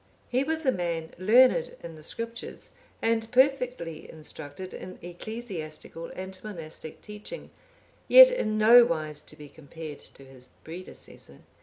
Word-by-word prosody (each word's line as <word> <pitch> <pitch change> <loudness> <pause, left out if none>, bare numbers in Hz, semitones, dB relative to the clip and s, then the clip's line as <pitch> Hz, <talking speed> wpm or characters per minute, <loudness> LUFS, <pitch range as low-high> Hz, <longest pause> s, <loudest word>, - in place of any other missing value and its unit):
(808) 250 - +4
He - - +2
was 320 +1 -1
a 260 - +5
man 170 -5 -3
learned 255 - +5
in 165 - -8
the 155 - -12
Scriptures, 230 +8 -6 0.3
and 225 0 +1
perfectly 250 - +1
instructed 155 +3 -8
in 185 - -8
ecclesiastical 175 -4 -6
and 190 0 -7
monastic 165 -6 -7
teaching, 210 - -8 0.6
yet - - +10
in 215 - -1
no 235 +3 +8
wise 155 -8 -2
to - - -8
be 150 - -11
compared 155 0 -9
to 135 - -8
his 130 -1 -14
predecessor. 175 +3 -10
185 Hz, 140 wpm, -28 LUFS, 160-240 Hz, 0.6 s, yet